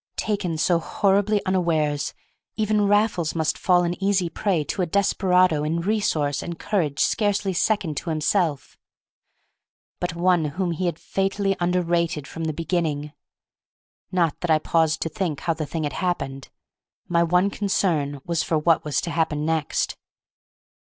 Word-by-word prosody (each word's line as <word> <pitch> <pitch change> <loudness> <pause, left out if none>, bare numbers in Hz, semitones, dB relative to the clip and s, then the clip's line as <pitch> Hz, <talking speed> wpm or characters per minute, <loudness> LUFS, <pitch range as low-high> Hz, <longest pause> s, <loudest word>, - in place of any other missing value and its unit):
Taken 200 -6 -1
so 170 +2 +2
horribly 200 +4 +1
unawares, 155 -6 0 0.4
even 215 -1 +1
Raffles 205 -6 +2
must 160 -1 0
fall 180 -1 +3
an 175 +2 -3
easy 195 -3 +2
prey 180 -4 0
to 165 - -3
a 180 - 0
desperado 185 -4 +2
in 160 +2 -1
resource 170 -7 0
and 170 -1 -6
courage 165 -10 -1
scarcely 205 -2 +1
second 180 -5 0
to 170 - -3
himself, 155 -1 0 1.2
but 175 -1 -2
one 175 -1 +2
whom 175 +4 -2
he 175 +2 -1
had 170 - -2
fatally 195 +1 -1
underrated 170 -4 0
from 165 0 -5
the 160 - 0
beginning. 155 -2 -2 1.0
Not 170 -4 +1
that 175 - -3
I 160 - +5
paused 160 0 +1
to 165 - -3
think 160 -3 -3
how 170 - 0
the 155 -2 -4
thing 160 +1 -3
had 145 - -2
happened; 135 -7 -3 0.6
my 170 -1 +2
one 180 +4 +2
concern 160 -9 0
was 170 -1 0
for 160 - 0
what 160 +1 +2
was 150 -2 -1
to 170 - -4
happen 155 -2 0
next. 160 -2 -1
170 Hz, 155 wpm, -24 LUFS, 155-190 Hz, 1.2 s, I